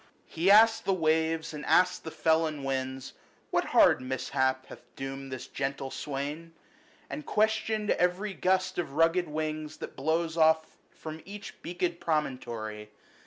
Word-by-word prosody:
90 160 - -8
He 185 - +4
asked 225 +2 +7
the 195 - +2
waves, 160 -1 +1
and 150 -1 -6
asked 180 0 +3
the 160 - -5
felon 160 -2 +1
winds, 130 -1 -3 0.4
What - - +1
hard - - +5
mishap 130 0 -1
hath - - -12
doomed 135 0 -6
this 130 - -5
gentle 135 -1 -4
swain? 150 +4 -5 0.5
And 300 - -6
questioned 220 -2 +1
every 180 +3 +1
gust 185 -1 +1
of 160 -5 -3
rugged 165 +3 +3
wings 155 0 -4
That - - -8
blows 165 +1 -1
off 160 0 +3
from 160 0 -9
each 205 +1 -10
beaked 175 0 -2
promontory. 120 -9 -3
160 Hz, 145 wpm, -29 LUFS, 135-180 Hz, 0.5 s, asked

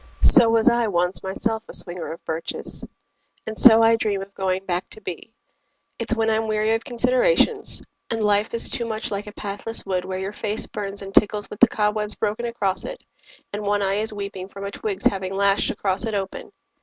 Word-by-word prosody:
So 240 -6 +8
was 225 +1 +2
I 235 -2 +3
once 180 -1 +1
myself 220 +4 -3
a - - 0
swinger 175 -1 -1
of 165 +1 -10
birches. 160 +1 0 0.6
And 220 - -5
so 225 -1 +8
I 225 0 +5
dream 205 -3 -2
of 195 0 -15
going 190 0 -2
back 180 0 -3
to - - -8
be. 185 +3 -8 0.7
It's 230 -1 -1
when 225 -1 0
I'm 220 0 0
weary 215 +1 +1
of 225 0 -1
considerations, 255 - +1 0.3
And 225 -1 -1
life 210 +1 +2
is 230 - +5
too 235 - -2
much 220 -1 -3
like 205 +1 -4
a - - -7
pathless 210 +2 -3
wood 185 -2 -2
Where 185 0 -4
your 190 +1 -4
face 215 +1 +2
burns 200 -1 -4
and 195 0 -9
tickles 210 0 +2
with 210 - -9
the 250 - +7
cobwebs 210 -1 0
Broken 220 +3 -2
across 205 -5 -2
it, - - -8 0.5
and 205 - -4
one 205 0 0
eye 195 +1 0
is 220 - -2
weeping 200 -2 -6
From 200 0 -8
a 200 - -5
twig's 200 -2 -5
having 190 -1 0
lashed 200 0 +2
across 190 +1 -1
it 225 -2 -2
open. 195 -1 -5
210 Hz, 205 wpm, -22 LUFS, 195-225 Hz, 0.7 s, So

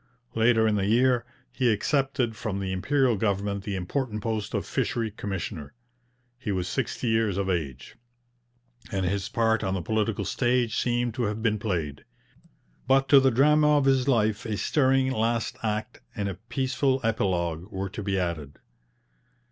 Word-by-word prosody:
Later 110 0 +3
in 105 -1 +2
the 100 -1 0
year 120 +2 +3 0.2
he 125 -3 +2
accepted 130 +1 0
from 105 -2 -3
the 95 -1 -3
Imperial 130 +6 +2
government 100 -1 -1
the 100 - -2
important 105 +3 -3
post 110 -2 -2
of - - -1
Fishery 115 -2 -1
Commissioner. 95 -8 -5 0.6
He 125 -6 -3
was 90 -2 -1
sixty 125 +2 -2
years 110 -4 +1
of 95 -1 0
age, 70 -8 -4 0.9
and 95 -3 -1
his 100 +3 -1
part 115 -2 +1
on 95 -1 -1
the 95 - -2
political 110 -1 -1
stage 120 +1 +1
seemed 120 -1 0
to 120 -1 -1
have 105 +1 -3
been 110 -2 +1
played. 85 -10 -3 0.8
But 135 +1 +3
to 140 - +9
the 135 0 +4
drama 150 +4 +4
of 140 - +2
his 135 -1 +3
life 110 -4 +2
a 110 -4 -3
stirring 130 - +2
last 115 -1 0
act 110 +1 -3
and 100 -1 -2
a 100 - -2 0.2
peaceful 135 0 +1
epilogue 90 -4 -1
were 95 0 -3
to 105 - -6
be 100 -1 -1
added. 80 -6 -3
110 Hz, 165 wpm, -26 LUFS, 95-125 Hz, 0.9 s, to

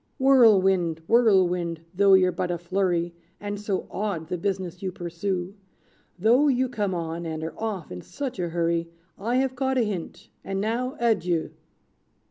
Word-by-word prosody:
"Whirlwind, 195 - +4
Whirlwind, 180 -8 +3
though 195 +1 +6
you're 185 -1 +4
but 180 - -3
a 175 - -1
flurry, 175 -1 -1 0.3
And 205 0 -5
so 200 -2 -2
odd 190 -6 -3
the 180 - -2
business 190 -2 -3
you 190 -1 -2
pursue; 175 +2 -4 0.6
Though 235 +10 +4
you 260 -2 +2
come 205 -6 -2
on, 165 0 -4
and 160 -1 -4
are 160 -1 -4
off, 205 -8 -4
in 90 0 -6
such 260 - -6
a 175 -1 -1
hurry, 170 0 0 0.3
I 230 +5 -1
have 260 0 +1
caught 265 0 0
a 245 - +3
hint; 195 -6 -5
and 195 0 -3
now 240 +6 -1
adieu!" 180 -8 +1
190 Hz, 160 wpm, -25 LUFS, 170-225 Hz, 0.6 s, though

